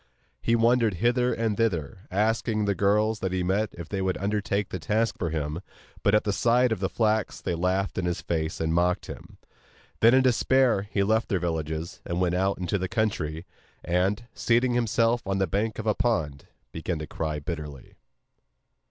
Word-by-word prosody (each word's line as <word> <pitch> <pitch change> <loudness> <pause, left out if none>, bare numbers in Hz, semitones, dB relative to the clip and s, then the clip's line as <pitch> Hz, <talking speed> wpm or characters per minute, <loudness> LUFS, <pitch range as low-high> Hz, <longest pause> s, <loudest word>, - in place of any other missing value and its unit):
He 115 - +2
wandered 115 -2 +3
hither 120 +6 +2
and 110 -2 0
thither, 90 -7 -2
asking 110 +2 0
the 100 - +2
girls 105 +3 +2
that 95 -2 -2
he 90 -1 -1
met 100 +4 +1
if 85 -2 -8
they 95 +1 -3
would 95 -1 0
undertake 100 0 -1
the 90 - -4
task 110 +6 0
for 85 - -1
him, 75 +1 -3 0.4
but 100 - +3
at 105 - +3
the 105 - 0
sight 120 +3 +3
of 110 - -1
the 95 0 -1
flax 110 -1 0
they - - -2
laughed 95 +3 0
in 90 - -1
his 85 -1 -1
face 80 -1 -2
and 80 0 0
mocked 90 +1 +1
at - - -6
him. - - -17 0.6
Then 115 +3 +6
in 130 - +5
despair 125 -4 +3
he 100 - +1
left 110 +3 +1
their 100 - +2
villages, 80 -1 -3
and 85 +1 -3
went 90 -1 +1
out 95 +2 +1
into 90 +2 -1
the 90 0 -3
country, 90 -8 -1 0.4
and, 95 +6 +1
seating 120 +1 +2
himself 115 0 +2
on 95 0 0
the 95 - +2
bank 105 +5 -1
of 110 - -5
a 110 - +3
pond 80 - -1 0.2
began 80 +2 -3
to 75 - -5
cry 75 0 -3
bitterly. 75 -3 -7
100 Hz, 195 wpm, -26 LUFS, 85-110 Hz, 0.6 s, Then